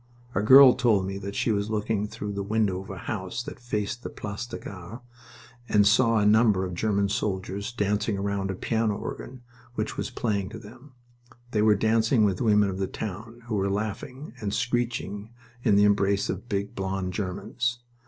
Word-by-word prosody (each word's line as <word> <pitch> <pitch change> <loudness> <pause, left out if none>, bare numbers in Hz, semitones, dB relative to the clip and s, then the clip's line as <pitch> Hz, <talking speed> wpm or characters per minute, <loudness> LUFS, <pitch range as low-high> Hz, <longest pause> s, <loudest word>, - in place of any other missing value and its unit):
A 100 - +1
girl 130 +4 +9
told 115 -7 +2
me 95 +1 -4
that 100 0 -6
she 115 - +1
was 100 0 -1
looking 105 -1 -1
through 105 0 -5
the 100 - -3
window 100 -2 0
of 95 - -12
a 95 - -6
house 105 +3 -3
that - - -8
faced 115 -1 -3
the - - -6
Place 105 +3 -6
de - - -7
la - - -14
Gare, 95 +4 -8 0.7
and 105 -1 +4
saw 115 +2 +4
a 105 - +2
number 105 -3 +4
of 90 - -5
German 100 +2 +1
soldiers 100 0 -2
dancing 105 -2 0
round 100 -1 -2
a 95 - -2
piano 110 +1 0
organ 125 -1 -7 0.3
which - - -3
was - - -2
playing 100 -4 -2
to 110 - -8
them. 120 +6 -14 0.6
They 105 - +1
were 105 -1 +5
dancing 110 +2 +3
with 95 -3 0
women 105 -4 +3
of 95 - -6
the 95 - 0
town, 110 +4 -7
who 120 - -5
were 100 -1 +1
laughing 110 +7 -4
and 100 -2 -2
screeching 115 -2 -2 0.3
in 110 -5 +3
the 100 - +5
embrace 100 0 +2
of 100 +6 -7
big, 100 0 -2
blond 95 -1 -3
Germans. 115 +6 -2
105 Hz, 195 wpm, -26 LUFS, 100-115 Hz, 0.7 s, girl